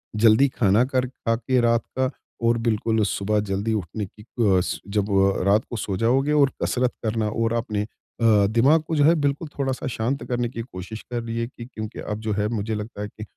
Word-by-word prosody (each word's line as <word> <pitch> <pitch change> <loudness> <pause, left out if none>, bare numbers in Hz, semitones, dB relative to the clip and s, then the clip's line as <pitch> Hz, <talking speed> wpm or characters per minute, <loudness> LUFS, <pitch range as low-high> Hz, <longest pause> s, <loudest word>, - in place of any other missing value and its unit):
जल्दी 110 +5 +5
खाना 105 +1 +4
कर 130 -1 0
खा 115 -2 -2
के 125 +2 +1
रात 115 0 +3 0.2
का 130 0 +2 0.4
और 115 0 +3
बिल्कुल 110 0 +1
सुबह 105 +2 0
जल्दी 100 +2 -1
उठने 105 +1 -3
की 100 +3 -16
अ, 105 -5 +2 0.3
जब 100 0 -1
वो 95 -1 +4
अ, 95 - -1
रात 100 +4 +3
को 120 - -4
सो 100 -2 -3
जाओगे 130 +7 +2
और 140 -2 +4
कसरत 125 0 +1
करना 110 -1 0
और 115 +1 0
आपने 115 -3 -1
अ, - - -8 0.6
दिमाग 130 +9 +4
को 165 - -1
जो 145 - +4
है 165 +3 +6
बिल्कुल 145 +1 -1
थोड़ा-सा 130 -2 -1
शांत 120 +3 -2
करने 120 -1 0
की 115 -1 -5
कोशिश 110 -1 -8
करिए 115 -1 -2
कि 120 -1 -10
क्योंकि 110 -3 -7
अब 105 0 -4
जो 110 -1 -2
है 105 +1 0
मुझे 110 -1 -2
लगता 105 0 -6
है 105 - -3
कि 105 +1 -10
115 Hz, 210 wpm, -24 LUFS, 105-125 Hz, 0.6 s, है